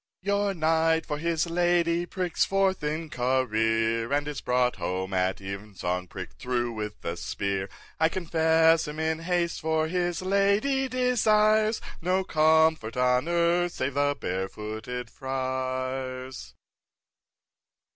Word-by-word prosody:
2. 200 - +1
Your 200 0 +1
knight 160 0 +2
for 150 -1 -3
his 165 0 0
lady 175 0 +1
pricks 180 -3 -1
forth 195 -3 +1
in 155 +2 -2
career, 115 -3 0
And 145 +1 +1
is 150 -2 -4
brought 125 -1 +1
home 95 +2 -3
at 95 0 0
even 100 +1 -7
song 90 0 -2
prick'd - - -9
through 120 -1 -1
with 105 -2 -6
a 85 - -2
spear; 95 +2 -3 0.3
I 160 0 +4
confess 160 -2 +3
him 150 +1 -6
in 160 0 0
haste—for 165 -2 0
his 175 0 -1
lady 200 +8 +2
desires 220 -3 +3 0.2
No 185 +2 +1
comfort 160 - +3
on 125 +3 +2
earth 170 +1 +2
save 130 +1 -2
the 145 +1 +1
Barefooted 110 +6 -4
Friar's. 130 0 -4
155 Hz, 125 wpm, -27 LUFS, 120-175 Hz, 0.3 s, I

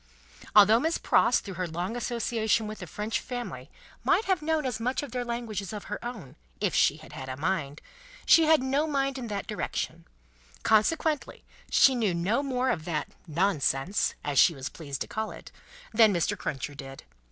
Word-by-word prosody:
Although 210 +2 +8
Miss 320 +5 0
Pross, 240 - +3
through 195 - -7
her 180 - -1
long 175 +7 -3
association 230 -2 0
with 215 -1 -7
a 180 - -6
French 210 +8 -2
family, 245 -1 -6 0.3
might 445 - +3
have 375 -4 +1
known 310 -1 0
as 245 -4 -2
much 250 +5 -1
of 285 - -7
their 250 0 -2
language 235 -3 -3
as 195 +1 -7
of 210 - -6
her 205 - -6
own, 240 - -7 0.2
if - - 0
she - - +3
had - - -14
had 130 0 -7
a 130 - -5
mind, 155 -2 -2 0.4
she 330 - +7
had 310 -4 +4
no 275 +4 +1
mind 275 -2 -1
in 240 - -5
that 205 -2 -4
direction; - - -4 0.6
consequently 300 +7 +1 0.3
she 270 - +6
knew 215 -8 0
no 195 +10 +1
more 260 -2 0
of 160 - -2
that 160 -3 -2 0.2
"nonsense" 165 0 +1
(as 145 -3 +1
she 165 - +6
was 135 -1 -5
pleased 140 -5 -7
to - - -2
call 220 0 -3
it) - - -11 0.4
than 220 -1 +6
Mr. 175 -4 0
Cruncher 140 +1 -4
did. 135 -1 -9
220 Hz, 190 wpm, -28 LUFS, 175-255 Hz, 0.6 s, Although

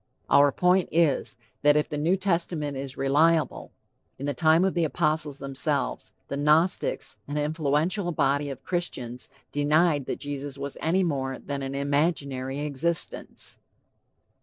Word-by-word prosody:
Our 140 0 +6
point 180 +4 +2
is, 160 -8 +1 0.2
that 145 0 +5
if 150 - +1
the 150 - -5
New 165 +5 +3
Testament 170 -6 -1
is 135 -1 -6
reliable, 155 +4 +2 0.5
in 140 - -5
the 145 - -1
time 160 +6 +4
of 190 - +1
the 170 - +1
apostles 155 -2 0
themselves, 140 +1 -2 0.2
the 140 - -4
Gnostics, 155 +5 +1
an 145 +1 -3
influential 155 +5 0
body 145 -1 +1
of 135 -1 -7
Christians, 130 -9 -3 0.2
denied 145 0 +2
that - - -2
Jesus 140 0 -5
was 140 0 -5
any 180 +4 +2
more 135 -5 -1
than 140 -1 -5
an 135 0 -4
imaginary 140 -2 -1
existence. 150 +3 -2
145 Hz, 140 wpm, -26 LUFS, 140-165 Hz, 0.5 s, Our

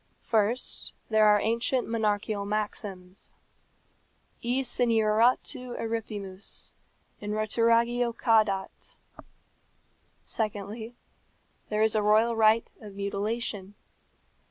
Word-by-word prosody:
First, 225 +2 0 0.2
there 215 -1 +5
are 210 0 +6
ancient 235 +4 0
monarchical 210 -2 -1
maxims. 200 -2 -5 1.1
E 245 +3 0
senioratu 240 +2 +1
eripimus. 210 -4 -5 0.5
In 210 0 -4
roturagio 230 +2 +2
cadat. 215 -5 0 1.3
Secondly, 220 +2 -4 0.7
there 215 0 +1
is 220 - +3
a 215 - +2
royal 215 +3 +3
right 220 +1 +4
of 205 -2 -10
mutilation. 200 0 -3
215 Hz, 85 wpm, -28 LUFS, 205-230 Hz, 1.3 s, are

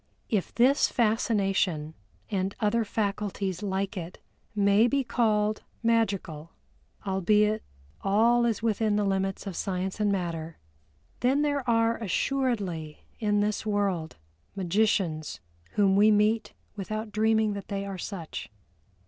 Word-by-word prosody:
If 205 -5 0
this 260 +4 +4
fascination 195 -8 +1 0.4
and 195 -1 -1
other 225 +2 +2
faculties 200 -3 -2
like 195 0 -2
it 175 -1 -6 0.4
may 200 +2 +4
be 275 +2 +1
called 215 -3 +1 0.2
Magical 195 -9 0 0.5
(albeit 210 +3 +2 0.4
all 230 +5 +3
is 225 -2 -1
within 215 -1 +1
the 210 - +2
limits 195 0 -1
of 195 -3 -5
science 190 +1 -3
and 210 -1 +2
matter), 165 -4 -3 0.6
then 270 +4 +2
there 285 -2 0
are 230 0 +3
assuredly 200 - -1 0.2
in 205 -2 +2
this 210 0 -1
world 200 -6 -1 0.4
magicians 185 -4 0 0.3
whom 195 -2 +3
we 210 +2 +6
meet 215 +1 +2 0.2
without 215 +2 -4
dreaming 220 0 +2
that 200 -1 -7
they 200 -1 -3
are 195 -2 -6
such. 170 - -6
205 Hz, 125 wpm, -27 LUFS, 190-220 Hz, 0.6 s, we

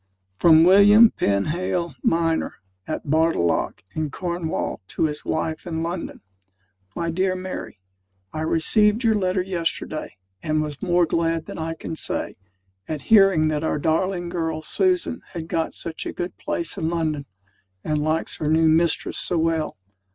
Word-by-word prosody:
FROM 160 - +6
WILLIAM 205 +5 +7
PENHALE, 170 - -1
MINER, 165 -1 +1 0.3
AT 155 - -4
BARTALLOCK, 155 - +1
IN 155 -1 -2
CORNWALL, 170 - -3
TO - - -2
HIS 150 -2 -1
WIFE 160 +2 -3
IN 160 -1 -2
LONDON. 170 +1 -5 0.7
MY 170 0 -2
DEAR 185 +2 0
MARY, 185 - -6 0.6
I 155 - -3
received 210 +8 +2
your 225 -1 +4
letter 185 -2 0
yesterday, 170 - -3 0.2
and 155 0 0
was 150 -2 -6
more 175 -1 +3
glad 165 0 0
than - - -8
I 165 0 -3
can 160 - -6
say, - - -2 0.5
at 155 -2 -4
hearing 195 -7 +6
that 150 0 -1
our 160 - 0
darling 175 +3 0
girl 160 -2 -3
Susan 360 - +1
has 170 -3 -4
got 165 0 -2
such 165 -1 -5
a - - -5
good 175 +1 -5
place 305 -7 -3
in 160 -2 -1
London, 155 -4 -2 0.6
and 150 -1 -1
likes 155 +2 -1
her 155 - -3
new 160 +1 +4
mistress 165 +1 +1
so 175 - 0
well. 160 -1 0
165 Hz, 150 wpm, -23 LUFS, 155-185 Hz, 0.7 s, WILLIAM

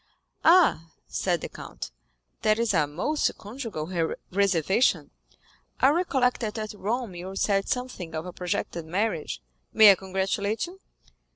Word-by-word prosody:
"Ah," 320 - +5
said 175 -4 -1
the - - -4
count, - - -8 0.5
"that 215 0 +3
is 230 -2 +1
a 155 -4 +3
most 235 - -1
conjugal 185 - -3 0.2
reservation; 190 - +2 0.7
I 265 - +6
recollect 275 -7 +1
that 220 -1 -3
at 215 -1 -4
Rome 220 +1 -3
you 180 +2 -7
said 195 0 +1
something 250 -10 -3
of 160 +2 -3
a 180 - -7
projected 170 -2 -3
marriage. 170 - -2 0.3
May 215 -2 +9
I - - +7
congratulate 195 - -1
you?" 360 +2 -12
200 Hz, 135 wpm, -26 LUFS, 175-235 Hz, 0.7 s, May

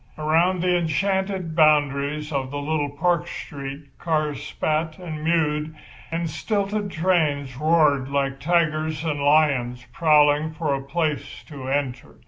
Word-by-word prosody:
Around 165 +4 +2
the 180 -1 +3
enchanted 185 +1 -1
boundaries 150 -1 +2
of 135 -2 -1
the 145 - -5
little 145 0 -1
park 170 +4 0
street 140 -3 -8
cars 155 -4 -1
spat 155 +1 -2
and 160 -4 -7
mewed 155 -1 0 0.3
and 165 +1 -2
the - - -1
stilted 200 +5 -2
trains 155 -7 0
roared 150 -2 +2
like 135 -1 -1
tigers 155 -1 0
and 150 -2 -1
lions 140 -5 +2
prowling 150 -1 +3
for 155 -3 -1
a 135 - -2
place 150 +2 -3
to 140 -4 -8
enter. 135 -2 -2
155 Hz, 135 wpm, -23 LUFS, 140-165 Hz, 0.3 s, the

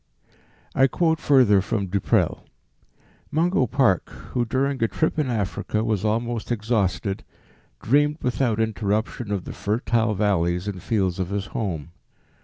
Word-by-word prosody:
I 135 - +5
quote 160 +3 +1
further 125 -9 +5
from 100 +1 -1
Du 100 +2 -1
Prel. - - +1 0.9
"Mungo 160 -3 +2
Park, 125 -7 +2 0.2
who 120 -1 +1
during 135 +2 -1
a 115 - +3
trip 160 - -1
in 150 - +1
Africa 110 -1 -1
was 110 -3 0
almost 115 +2 -1
exhausted, 105 -4 -1 0.6
dreamed 145 +5 +3
without 120 -2 0
interruption 110 0 -1
of 100 -3 -1
the - - -6
fertile 110 +1 0
valleys 90 -2 +1
and 95 -3 -4
fields 95 -3 0
of 90 -1 -2
his 100 -1 -2
home. 85 -7 -3
110 Hz, 140 wpm, -24 LUFS, 100-125 Hz, 0.9 s, I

